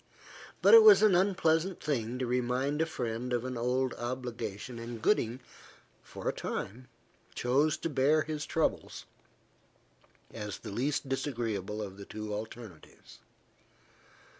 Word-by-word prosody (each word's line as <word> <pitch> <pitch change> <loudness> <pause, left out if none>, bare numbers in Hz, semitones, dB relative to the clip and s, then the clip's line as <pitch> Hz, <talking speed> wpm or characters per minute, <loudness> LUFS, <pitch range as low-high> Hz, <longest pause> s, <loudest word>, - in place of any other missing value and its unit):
But - - +7
it 455 - +12
was 430 - +8
an 215 -3 +6
unpleasant 180 -1 +2
thing 125 -4 -2
to 130 - -2
remind 125 +4 0
a 165 - +1
friend 120 -3 -4
of 120 0 -1
an 130 0 -4
old 125 +2 0
obligation, 120 -2 -5
and 115 0 -7
Gooding, 120 - +1 0.6
for - - -8
a - - +1
time, 125 +6 -5 0.5
chose 140 +5 +2
to - - -3
bear 150 +1 +2
his 150 -1 -4
troubles, 160 - -1 1.3
as 105 -3 -5
the - - -9
least 135 +6 -1
disagreeable 115 -6 -3
of 95 -1 -8
the 100 - -9
two 105 0 -6
alternatives. 110 -4 -9
125 Hz, 135 wpm, -30 LUFS, 115-150 Hz, 1.3 s, it